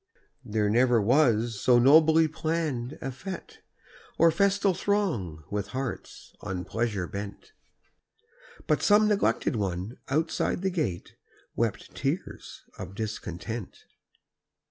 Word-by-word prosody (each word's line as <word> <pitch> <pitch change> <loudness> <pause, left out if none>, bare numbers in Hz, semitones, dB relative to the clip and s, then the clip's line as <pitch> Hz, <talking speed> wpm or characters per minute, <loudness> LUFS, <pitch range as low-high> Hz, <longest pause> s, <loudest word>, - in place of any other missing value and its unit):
There 105 -3 0
never 120 +2 +4
was 115 -2 +2
so 125 -1 +5
nobly 160 +5 +6
planned 155 -5 -2
a 135 - -3
fête, 175 +8 -8 0.6
Or 165 0 +6
festal 200 +2 +2
throng 160 - -1
with 100 -1 -2
hearts 135 -3 -6
on 90 -2 -4
pleasure 105 -1 -2
bent, 100 - -8 1.1
But - - +1
some 210 +1 +5
neglected 195 - +1
one 95 +2 -3
outside 160 +5 0
the 190 - +1
gate 150 - -3 0.4
Wept - - -2
tears - - -4 0.2
of 95 - -7
discontent. 110 0 -6
120 Hz, 110 wpm, -27 LUFS, 105-160 Hz, 1.1 s, nobly